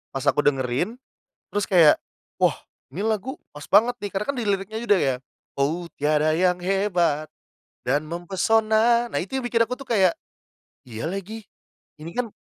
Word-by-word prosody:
pas 135 - -2
aku - - +2
dengerin, 135 - 0 0.5
terus 205 0 -1
kayak 170 -5 +6 0.4
wah - - +3 0.4
ini 175 +10 -5
lagu 225 +5 -1 0.2
pas 145 0 -10
banget 225 +5 +5
nih 205 - -3
karena 195 +1 -3
kan - - -9
diliriknya 205 0 -1
juga 210 -4 +3
ya, 135 -7 +1 0.5
oh 160 +6 0 0.2
tiada 150 +1 +2
yang 180 +2 +2
hebat, 180 -5 0 0.6
dan 135 +4 +2
mempesona 220 +7 +2
nah - - 0
itu 200 +9 -4
yang 260 - -3
bikin 235 -1 0
aku 250 - -3
tuh 275 - -10
kayak, 190 -5 +3 0.7
iya 115 +1 -7
lagi 195 +6 -5 0.6
ini 165 +2 -9
kan 245 -3 -2
190 Hz, 160 wpm, -24 LUFS, 155-220 Hz, 0.7 s, kayak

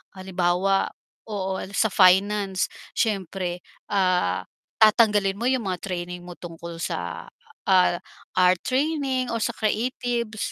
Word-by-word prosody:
Halimbawa 185 +1 +1 0.4
oo 190 -2 -2 0.2
sa 220 - +3
finance 195 +1 +4 0.3
siyempre, 185 -4 -1 0.3
ah, 185 -2 +2 0.4
tatanggalin 210 -3 +5
mo 240 - -2
yung 255 -5 0
mga 180 -1 -2
training 180 0 -4
mo 175 -1 -9
tungkol 170 -1 -8
sa, 85 -1 -4 0.4
ah, 185 -2 +4 0.4
art 180 -1 +5
training 265 -2 0
o 230 - -1
sa 235 +1 -1
creatives. 235 0 -1
195 Hz, 115 wpm, -24 LUFS, 180-220 Hz, 0.4 s, tatanggalin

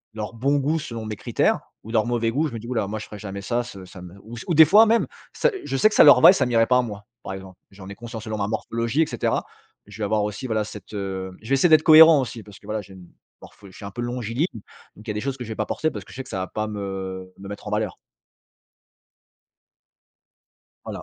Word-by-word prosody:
leur 110 0 -5
bon 135 +5 +1
goût 150 +4 0
selon 115 -6 -6
mes 110 0 -4
critères, - - 0 0.2
ou 110 - -9
leur 110 -2 +2
mauvai 115 -1 0
goût, 150 +6 0
je 140 - -8
me - - -4
dis: 115 - -10
«houlà, 115 -5 -1
moi 105 +2 -4
je 110 - -7
ferai 105 - -10
jamais 100 -1 -7
ça 120 +4 0
ce 100 -6 -10
ça 90 0 -12
me» 90 +1 -11
ou, 115 +2 -10
s 115 - -7
ou 170 - 0
des 160 +1 +9
fois 215 +8 +6
même, 230 +1 +3 0.3
ça - - +2
je 135 - -3
sais 175 - +5
que 215 - -5
ça - - +8
leur 145 -4 +8
va 125 - +9
et - - +3
ça 130 -9 +1
m'irait 115 -2 +3
pas 125 +2 +3
à - - +4
moi, 105 -4 -7 0.2
par - - -6
exemple. 95 -1 -10
J'en 95 -1 -13
ai - - -7
conscience, 115 -1 -8
selon 110 -2 -4
ma 100 - -1
morphologie 115 +6 -1
et - - 0
cetera. - - -2 0.4
Je - - -13
vais 110 - -2
avoir 105 0 +1
aussi 105 +5 -4
voilà, 110 -3 0
cette, 105 - -11
heu 95 -2 -4
je 110 - -11
vais 135 - +4
essayer 135 +6 +4
d'être 155 -1 +6
cohérent 160 -1 +8
aussi, 120 -2 -6
parce 105 -2 -14
que - - -20
voilà, 110 +1 -3
j'ai 95 -1 -15
une, 90 -2 -14 0.3
morpho 100 - -15
je 95 - -17
suis - - -12
un 100 - -6
peu 120 - -6
longiligne, 120 - -2 0.5
donc 105 - -15
il - - -4
y - - 0
a - - -3
des 105 - -3
choses 135 +3 -3
que 125 - -7
je 115 - -10
vais 110 - -4
pas 110 - -1
porter 155 +8 -1
parce 105 -6 -8
que - - -14
je - - -12
sais 130 - -5
que - - -15
ça - - -4
va 95 - -3
pas 110 0 -3
me 95 -3 -6
me 100 0 -10
mettre 100 +1 -8
en - - -5
valeur. 105 -2 -1 2.9
Voilà. - - -7
110 Hz, 285 wpm, -23 LUFS, 100-125 Hz, 2.9 s, des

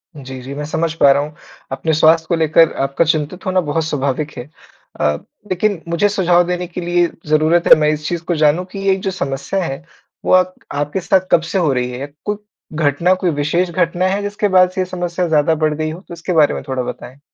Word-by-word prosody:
जी, 130 -2 -8
जी 135 +2 -8
मैं 150 0 -4
समझ 160 +1 -1
पा 140 - +7
रहा 140 +1 +3
हूँ 150 +1 -8 0.4
अपने 160 +4 -1
स्वास्थ्य 160 +1 +4
को 170 - +2
लेकर 160 0 +4
आपका 140 +4 +1
चिंतित 155 +3 -1
होना 185 0 +1
बहुत 160 +1 -1
स्वाभाविक 145 0 -2
है। 120 +4 -7 0.5
अ, 75 0 +2 0.4
लेकिन, 185 -1 0
मुझे 170 +5 +1
सुझाव 175 -3 +3
देने 180 0 -2
के 180 +1 -6
लिए 175 0 +2 0.2
ज़रूरत 155 +3 +2
है - - +10
मैं 150 0 +3
इस 150 0 -5
चीज़ 175 -1 -3
को 175 - 0
जानूँ 155 +3 +2
कि 200 - -6
ये 190 - +4
जो 190 - +1
समस्या 180 +3 -3
है 135 -3 -5 0.4
वो - - 0
अक 185 0 +4 0.2
आपके 145 +5 -2
साथ 185 +1 +1
कब 165 - +5
से - - -1
हो 155 -5 +2
रही 125 -1 -1
है? 140 +3 -7
कु 210 0 -1 0.4
घटना 155 +3 +2
कोई 185 -1 -1
विशेष 155 +5 0
घटना 175 +1 0
है 195 +2 -1
जिसके 205 +1 -1
बाद 185 0 +6
से 185 - -2
ये - - 0
समस्या 175 -1 -3
ज़्यादा 160 0 +2
बढ़ 155 0 0
गई 155 +1 -2
हो? 165 - -8
तो 180 - -12
उसके 170 +2 -4
बारे 155 -3 +4
में - - -5
थोड़ा 130 -1 -2
बताएँ। 125 +2 -8
165 Hz, 230 wpm, -17 LUFS, 145-180 Hz, 0.5 s, है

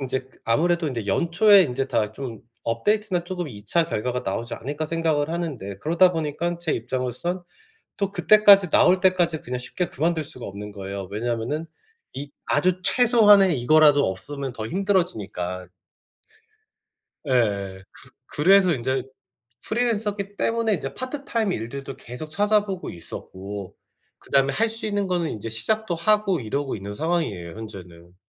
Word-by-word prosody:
인제 130 -1 -1
그 130 0 -23
아무래도 170 +7 +2
인제 115 -7 -4
'연초에 185 - +5
인제 135 -1 -2
다 105 -5 0
좀 120 -6 -7 0.2
업데이트나 185 - 0
쪼금 175 -3 -4
2 105 -4 -10
차 170 +10 +3
결과가 125 -4 -2
나오지 115 +5 -3
않을까.' 145 +5 -4
생각을 160 -3 0
하는데 150 - -4
그러다 170 - +4
보니깐 165 +2 -2
제 170 -2 -1
입장으로선 130 +9 -3 0.6
또 200 -1 -1
그때까지 200 0 +6
나올 180 +3 +4
때까지 180 -4 +2
그냥 125 +1 -4
쉽게 175 +8 -2
그만둘 160 +2 -1
수가 130 -3 -8
없는 105 +1 -7
거예요. 100 -1 -6
왜냐하면은 120 +7 -2 0.5
이 140 +1 -7
아주 180 +4 +1
최소한의 205 - +5
이거라도 145 +2 +5
없으면 135 +7 -5
더 110 -2 -5
힘들어지니까. 110 - -1 1.6
예예. 100 -7 0
그 - - -12 0.2
그래서 185 +3 +4
인제 130 +1 -1 0.6
프리랜서기 210 -3 -1
때문에 230 -1 +1
인제 135 -5 -6
파트타임 255 -5 -2
일들도 135 +2 -5
계속 125 +6 -8
찾아보고 205 +1 0
있었고 95 +3 -7 0.4
그다음에 135 0 +1
할 225 +7 +2
수 225 0 -2
있는 205 -1 0
거는 175 -3 0
인제 110 +1 -5
시작도 180 - 0
하고 205 0 +2
이러고 135 +4 -3
있는 100 0 -7
상황이에요 110 - -2
현재는. 90 -5 -10
150 Hz, 350 characters per minute, -24 LUFS, 115-185 Hz, 1.6 s, 그때까지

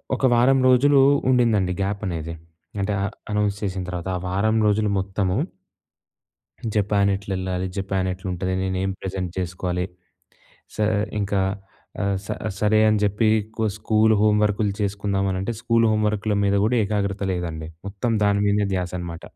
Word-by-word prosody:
ఒక 130 - 0
వారం 130 +3 +4
రోజులు 135 +3 +5 0.3
ఉండిందండి 110 -7 +3
గ్యాపనేది. 95 -5 -3 0.5
అంటే 100 +1 -1
అ - - +1 0.3
అనౌన్స్ 105 -1 0
జేసిన 95 -2 -2
తర్వాత. 90 0 -5
ఆ - - -5
వారం 110 +4 +1
రోజులు 105 0 +2
మొత్తము 95 -1 -1 1.4
జపాన్ 100 -1 +2
ఎట్లెళ్ళాలి? 95 -2 -3
జపాన్ 95 -1 -1
ఎట్లుంటది? 95 0 -3
నేను 95 0 -1
ఏం 95 - 0
ప్రెజెంట్ 95 -2 -4
చేసుకోలి 90 0 -2 0.9
సర్ 110 0 +2 0.3
ఇంకా 100 -1 0 0.6
ఆహ్, 100 0 +1
స - - -12 0.3
సరే 105 0 +3
అని 110 -1 +3
జెప్పి 105 +2 +2
ఎక్కువ 110 +1 -4
స్కూలు 110 0 +3
హోంవర్క్‌లు 105 -1 +2
చేసుకుందామనంటే 100 0 -1
స్కూలు 115 -1 +2
హోంవర్క్‌ల 105 0 0
మీద 100 0 +2
గూడా 115 +4 +2
ఏకాగ్రత 100 -1 -1
లేదండి. 80 -3 -4 0.2
మొత్తం 100 +4 -2
దాని 100 0 +2
మీదే 105 0 +2
ధ్యాసనమాట. 90 -2 -4
100 Hz, 135 wpm, -23 LUFS, 95-105 Hz, 1.4 s, రోజులు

